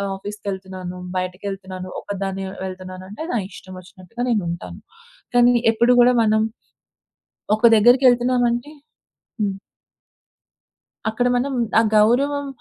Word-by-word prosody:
ఆఫీస్‌కేళ్తున్నాను, 190 -2 -7 0.2
బయటకేళ్తున్నాను, 185 0 -5
ఒకదాన్ని 195 -1 -4 0.2
వెళ్తున్నాను 185 0 -8
అంటే 210 +10 -7
నా 240 - +1
ఇష్టం 185 0 -11
ఒచ్చినట్టుగా 185 +6 -8
నేను 215 -5 +1
ఉంటాను. 170 +1 -7 0.6
కానీ 245 0 +6 0.2
ఎప్పుడు 235 +2 +3
గూడా 250 +1 +5
మనం 215 0 +2 1.1
ఒక 215 - -15
దగ్గరికేళ్తున్నాం 245 +2 +4
అంటే 240 +5 -4 0.7
హ్మ్. 200 -2 -1 1.5
అక్కడ 225 +3 0
మనం 270 +3 -1 0.3
ఆ - - +4
గౌరవం 275 +7 +3
210 Hz, 105 wpm, -21 LUFS, 190-245 Hz, 1.5 s, కానీ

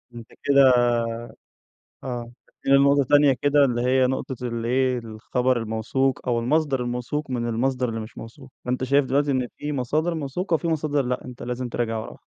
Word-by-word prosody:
أنت 115 -1 -9 0.2
كده 135 -3 +5 1.2
آه، 120 -2 -5 0.2
بس - - -31
في 135 - -2
نقطة 140 0 +5
تانية 145 -1 +6
كده، 145 0 +4
اللي 120 -2 0
هي 130 0 +3
نقطة 130 0 -3
اللي 115 -1 -3
إيه، 130 0 +1
الخبر 120 +3 -1
الموثوق 120 +4 -1
أو 120 -1 +2
المصدر 135 +2 +1
الموثوق 125 +4 -3
من 120 -2 -2
المصدر 125 +2 0
اللي 115 0 -3
مش 110 +1 -9
موثوق، 130 +4 -11
فأنت 125 +1 -1
شايف 140 +2 +3
دلوقتي 140 +2 +1
إن 130 -2 0
في 150 0 -4
مصادر 155 +6 -1
موثوقة 165 +4 -2
وفي 170 +1 0
مصادر 150 -3 0
لأ، 125 0 -3
أنت 125 -1 -9
لازم 125 +1 -4
تراجع 115 -1 -2
وراها. 110 - -8
130 Hz, 180 wpm, -24 LUFS, 120-140 Hz, 1.2 s, تانية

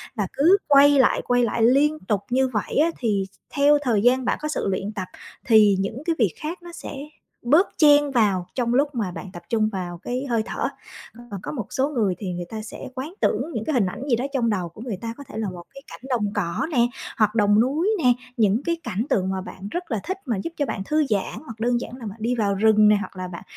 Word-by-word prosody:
và 205 -5 -1
cứ 335 +8 +5
quay 285 0 +7
lại, - - +4
quay 245 0 +3
lại 230 0 0
liên 290 +6 +4
tục 200 +1 -1
như 260 +2 +2
vậy 215 -5 -3
á 320 +4 +4
thì 205 -5 0 0.2
theo 290 +1 +4
thời 235 -7 +1
gian 250 +3 +3
bạn - - +1
có 305 - -2
sự 305 - -2
luyện 195 +1 -2
tập, 185 -4 -4 0.4
thì 215 -3 +6
những 210 +8 -3
cái 335 - +1
việc 210 -8 +2
khác 335 +4 -5
nó 345 - -9
sẽ 315 - -8 0.5
bớt 305 +11 +4
chen 290 -3 +5
vào 200 -7 +2
trong 240 -2 0
lúc 285 +1 +1
mà 205 -6 -1
bạn 185 - -8
tập 175 - -9
trung 215 -2 +2
vào 175 -3 -5
cái 250 +8 -4
hơi 230 -2 +2
thở. - - -2 0.6
Còn 200 -2 -5
có - - -4
một 240 -9 -4
số 270 +2 0
người 225 -10 0
thì 185 -4 -4
người 175 0 -5
ta 220 -1 -5
sẽ 215 - -8
quán 275 +7 -5
tưởng 330 - 0
những 220 -3 -3
cái 310 - -1
hình 230 -6 +3
ảnh 215 +8 -5
gì 235 - +4
đó 245 +3 -2
trong 235 -4 +1
đầu 185 -5 -1
của 170 - -13
người 225 -6 -4
ta, 230 +3 -5
có 285 - -9
thể - - -8
là 215 -3 -2
một 175 -1 -9
cái 275 - -11
cảnh - - -9
đồng 210 -5 0
cỏ 175 - -1
nè, 240 -3 +3 0.3
hoặc 215 0 +2
đồng 205 -1 +4
núi 295 - +2
nè, 250 -1 +6 0.2
những 220 +3 +2
cái 335 0 -1
cảnh 210 +1 -2
tượng 190 -2 +1
mà 190 0 -2
bạn 190 0 -9
rất 350 -3 -5
là 225 - 0
thích 375 - -3
mà 235 -7 -1
giúp 330 - -5
cho 290 - +1
bạn 220 -6 -4
thư 305 0 +2
giãn, 200 -3 -1
hoặc 225 -2 -10
đơn 240 +1 +1
giản - - -7
là 235 - -9
bạn 205 0 -7
đi 245 +2 0
vào 205 -3 0
rừng 215 +1 +5
nè 210 - +6
hoặc 205 - -7
là 185 0 -4
bạn 175 -1 -9
230 Hz, 260 wpm, -23 LUFS, 200-275 Hz, 0.6 s, quay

